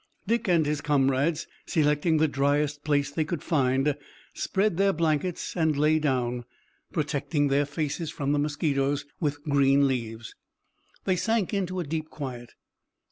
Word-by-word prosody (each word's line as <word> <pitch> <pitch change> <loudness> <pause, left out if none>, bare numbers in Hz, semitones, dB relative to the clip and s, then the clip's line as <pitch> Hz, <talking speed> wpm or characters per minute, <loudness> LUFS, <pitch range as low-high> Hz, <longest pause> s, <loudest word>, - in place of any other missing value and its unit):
Dick 230 +2 0
and 170 -4 +3
his 150 0 -1
comrades, 145 +3 +1 0.2
selecting 150 +1 +2
the 155 +1 +3
dryest 145 +1 0
place 145 -2 +1
they 155 +2 0
could 155 +1 -4
find, 135 -3 +2 0.4
spread 195 -2 0
their 195 0 +4
blankets 165 +2 -1
and 160 -4 +1
lay 155 +2 +3
down. 125 -4 0 0.5
Protecting 145 -1 0
their 140 +1 +2
faces 155 +2 -3
from 145 -3 -2
the 145 - +2
mosquitoes 145 -1 0
with 145 -3 -2
green 140 -2 +4
leaves, 115 -3 -4 0.7
they 185 - +2
sank 220 +1 0
into 185 -2 -1
a - - -1
deep 155 +1 -4
quiet. 125 -5 -7
150 Hz, 145 wpm, -27 LUFS, 140-160 Hz, 0.7 s, their